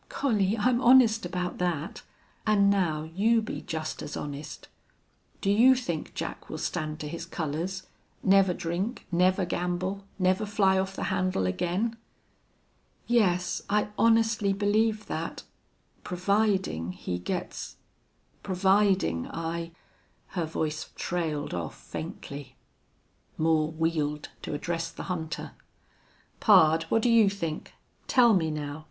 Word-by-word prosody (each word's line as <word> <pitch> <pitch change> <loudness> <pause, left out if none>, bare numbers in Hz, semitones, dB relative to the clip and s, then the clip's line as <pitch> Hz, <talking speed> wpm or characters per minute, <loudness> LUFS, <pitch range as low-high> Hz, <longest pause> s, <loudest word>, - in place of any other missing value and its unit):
"Collie, 215 -6 +1
I'm 245 +3 +2
honest 235 -6 +6
about 180 0 -3
that. 170 -4 -2 0.5
And 200 -2 +5
now 165 -6 +1
you 200 +9 +2
be 220 - -5
just 160 -1 -4
as - - -5
honest. 145 0 -7 0.7
Do 200 - +2
you 245 +6 +6
think 175 -11 -4
Jack - - -5
will - - -5
stand 155 0 -3
to 150 - -4
his 165 +2 -5
colors? 170 +3 -3 0.4
Never 195 -1 +5
drink 180 +7 -3
never 185 +2 +3
gamble 180 +3 -2
never 185 +2 +2
fly 195 -2 +3
off 190 0 -2
the - - -4
handle 185 - 0
again?" 180 - -1 1.1
"Yes, 180 -7 +2
I 210 0 +1
honestly 225 -3 +3
believe 215 +2 +1
that - - -4 0.6
providing 185 - 0
he 90 -1 -4
gets 90 - -4 0.7
providing 190 - +2
I 165 0 -4 0.3
" - - -39
Her 175 -3 0
voice 155 -1 -3
trailed 160 -4 -2
off 85 -2 -4
faintly. 140 -2 -8 0.8
Moore 155 -1 +2
wheeled 155 -2 -1
to - - -4
address 165 +2 -2
the - - -8
hunter. 160 -2 -5 0.9
"Pard, 165 -6 +5
what 225 - +2
do 245 - +3
you 225 -3 +6
think? 170 -6 -5 0.3
Tell 240 -3 +5
me 165 -5 +2
now. 150 -1 -4
180 Hz, 125 wpm, -28 LUFS, 160-205 Hz, 1.1 s, honest